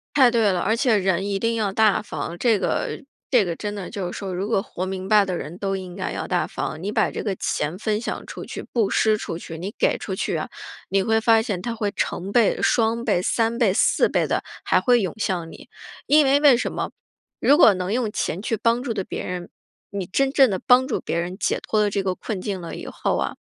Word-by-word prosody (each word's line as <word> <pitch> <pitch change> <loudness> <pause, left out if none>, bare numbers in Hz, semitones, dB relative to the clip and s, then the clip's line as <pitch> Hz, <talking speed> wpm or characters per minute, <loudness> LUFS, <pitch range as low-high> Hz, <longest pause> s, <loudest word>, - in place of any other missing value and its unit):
太 260 -4 +6
对 225 -4 +3
了， 180 - 0
而 220 +5 +1
且 235 -2 +3
人 190 -1 0
一 200 -1 -1
定 230 +3 0
要 215 -3 -1
大 215 0 +3
方， 165 -2 -5
这 230 -1 +3
个 - - -2 0.3
这 245 -6 +4
个 170 -2 -2
真 205 +4 -5
的 200 -3 -6
就 185 -3 -4
是 - - -7
说 195 -2 -5
如 190 +3 -3
果 205 -4 +1
活 185 - -5
明 190 0 -5
白 210 -1 +5
的 185 -2 -3
人 165 +3 -7
都 195 -1 -1
应 185 -2 -7
该 185 - -3
要 - - -4
大 180 -1 0
方。 155 - -5
你 200 - -2
把 - - +1
这 - - -5
个 200 -3 -2
钱 155 +1 -2
分 215 0 -1
享 235 - -5
出 - - -8
去、 - - -7
布 225 -5 +1
施 215 -1 +3
出 165 -5 -5
去、 165 -1 -8
你 190 +5 -5
给 - - +2
出 - - -4
去 - - -2
啊， - - -3 0.4
你 195 0 +2
会 220 +3 +2
发 225 0 +5
现 200 -5 -3
它 235 +2 -3
会 210 -3 -2
成 190 +3 -3
倍、 230 -2 +3
双 230 0 +2
倍、 175 - +1
3 230 +3 0
倍、 225 -6 +3
4 - - +3
倍 - - +1
地 - - -1 0.2
还 - - +3
会 245 -1 +4
涌 190 -4 -2
向 175 -6 -2
你。 - - -13 0.4
因 300 +1 +5
为 275 +1 +4
为 285 -4 +7
什 240 - -2
么， - - -3 0.5
如 285 - +5
果 225 - +7
能 185 +1 -3
用 235 -2 0
钱 190 -3 -3
去 225 - -1
帮 230 +3 +1
助 250 - -2
地 200 -4 -3
别 - - -5
人， 180 -1 -5 0.4
你 200 -2 -3
真 270 +9 +1
正 270 -4 +5
地 190 - -1
帮 250 +1 +6
助 255 - -1
别 - - -2
人 180 +2 -5
解 - - 0
脱 215 - 0
了 210 -1 +2
这 200 0 -1
个 190 -1 -1
困 200 0 -5
境 195 -1 -4
了 170 - -7
以 - - -7
后 - - -1
啊 - - -2
205 Hz, 265 characters per minute, -23 LUFS, 185-230 Hz, 0.5 s, 为